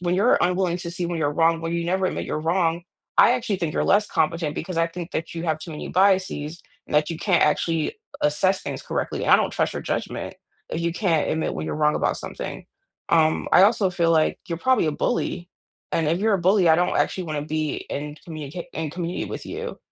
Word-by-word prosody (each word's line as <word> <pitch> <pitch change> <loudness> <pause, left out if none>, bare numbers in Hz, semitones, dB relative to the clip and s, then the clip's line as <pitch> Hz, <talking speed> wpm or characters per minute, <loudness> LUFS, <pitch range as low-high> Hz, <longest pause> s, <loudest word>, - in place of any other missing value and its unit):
when 175 0 0
you're 205 +6 +4
unwilling 180 0 +1
to 170 -1 -5
see 175 +1 -3
when 170 -1 -2
you're 145 -2 +1
wrong, 165 +1 +3
when 165 0 -3
you 170 0 -1
never 185 +2 +1
admit - - -3
you're 155 - -3
wrong, 170 0 +1 0.3
I - - +7
actually 220 -5 -1
think 165 -3 -3
you're - - +1
less 210 +2 +3
competent 155 -1 0
because 170 0 -4
I 165 - +3
think 175 +1 -7
that 160 +1 -4
you 165 - -4
have 155 -2 0
too 160 +1 -8
many 150 - -6
biases 185 -4 +1 0.2
and - - -7
that 150 +2 +3
you 165 - -4
can't 180 -1 +2
actually 160 - 0 0.3
assess 185 +6 +2
things - - -5
correctly, - - -3
and - - +1
I - - +9
don't - - 0
trust - - -1
your - - -4
judgment - - -4 0.3
if 165 - -2
you 170 0 0
can't 175 -5 +1
admit 160 - -1
when 80 - -4
you're - - -3
wrong 150 0 +2
about - - 0
something. - - -6 0.5
Um, 160 -1 +3
I 180 - +8
also 205 -3 +3
feel 170 -2 +1
like 160 -1 +2
you're 170 -1 -3
probably 260 -6 +2
a 155 - +1
bully. 175 +3 -2 0.4
And 160 -2 +1
if 170 - +1
you're 220 -1 +3
a - - +1
bully, 185 0 +4
I 160 - +6
don't 180 0 +1
actually 185 - 0
want 155 -3 -3
to 150 - -7
be 155 -1 -1
in 150 +1 -4
communica 155 +1 -6
in 160 -1 -2
community 175 +1 -3
with - - -6
you 475 +1 -6
170 Hz, 235 wpm, -24 LUFS, 155-185 Hz, 0.5 s, I